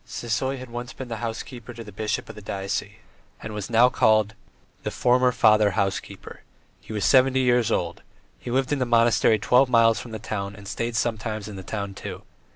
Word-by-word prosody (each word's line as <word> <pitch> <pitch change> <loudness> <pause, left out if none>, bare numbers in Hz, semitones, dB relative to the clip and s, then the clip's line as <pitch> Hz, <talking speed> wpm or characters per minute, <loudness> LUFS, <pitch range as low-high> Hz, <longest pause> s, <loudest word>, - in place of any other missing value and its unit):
Sisoy 130 +3 -2
had 130 -2 -10
once 120 +2 -6
been 130 -3 -8
housekeeper 120 +1 -6
to 115 - -8
the 105 - -11
bishop 105 +2 -3
of 110 - -8
the 105 - -11
diocese, 100 0 -4 0.5
and 110 - -7
was 105 -2 -4 0.3
called 110 -1 +4
now 110 - -18 0.5
"the - - -3
former 125 +1 +3
Father 105 -3 +4
Housekeeper"; 95 -2 -3 0.4
he - - -13
was 105 -3 -1
seventy 130 0 +4
years 125 -3 +3
old, 85 -4 -1 0.4
he - - -8
lived 130 +3 0
in 140 - -1
a - - +2
monastery 115 -1 +4
twelve 125 +5 +3
miles 115 -2 +4
from 120 - -9
the 110 - -5
town 100 -2 -5
and 100 -1 -12
stayed 115 +3 -3
sometimes 110 -2 -2
in 105 - -8
the 95 - -7
town, 100 +1 -5
too. - - -8
115 Hz, 195 wpm, -24 LUFS, 105-125 Hz, 0.5 s, called